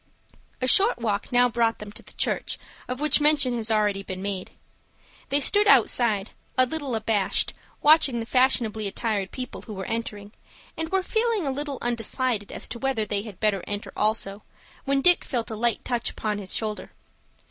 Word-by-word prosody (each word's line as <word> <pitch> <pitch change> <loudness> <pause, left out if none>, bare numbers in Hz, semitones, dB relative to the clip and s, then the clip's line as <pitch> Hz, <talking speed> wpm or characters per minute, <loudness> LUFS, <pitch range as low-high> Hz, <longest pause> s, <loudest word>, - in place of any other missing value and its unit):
A 255 - +1
short 400 - +5
walk 215 -4 -2
now 245 0 +5
brought 230 -1 +1
them 210 -1 -9
to - - -9
the - - -13
church - - -1 0.3
of 250 +1 -4
which 300 0 +2
mention 290 -4 +3
has 230 -1 -1
already 210 -2 +1
been 185 -1 -7
made. 195 -2 -4 0.8
They 280 +1 +3
stood 410 +8 +5
outside, 220 - +3 0.3
a 255 - +6
little 280 -3 -3
abashed, 215 -3 +1 0.3
watching 295 -5 +5
the 225 - -4
fashionably 230 -4 +1
attired 200 -1 -2
people 255 -1 -6
who 215 - -9
were 190 0 -5
entering, 210 -3 -5 0.4
and 320 0 -3
were 380 +1 +1
feeling 445 -2 0
a 275 - 0
little 285 0 -4
undecided 235 -2 -1
as - - -3
to 235 - -6
whether 265 -5 -1
they 205 -1 -1
had 205 -4 -10
better 210 -4 +1
enter 205 0 -5
also, 210 -1 0 0.4
when 275 0 +1
Dick 355 0 +5
felt 235 -4 -3
a - - -3
light 235 0 0
touch 240 -2 -1
upon 210 -1 -3
his 190 -2 -3
shoulder. 215 -1 -3
230 Hz, 180 wpm, -25 LUFS, 210-270 Hz, 0.8 s, a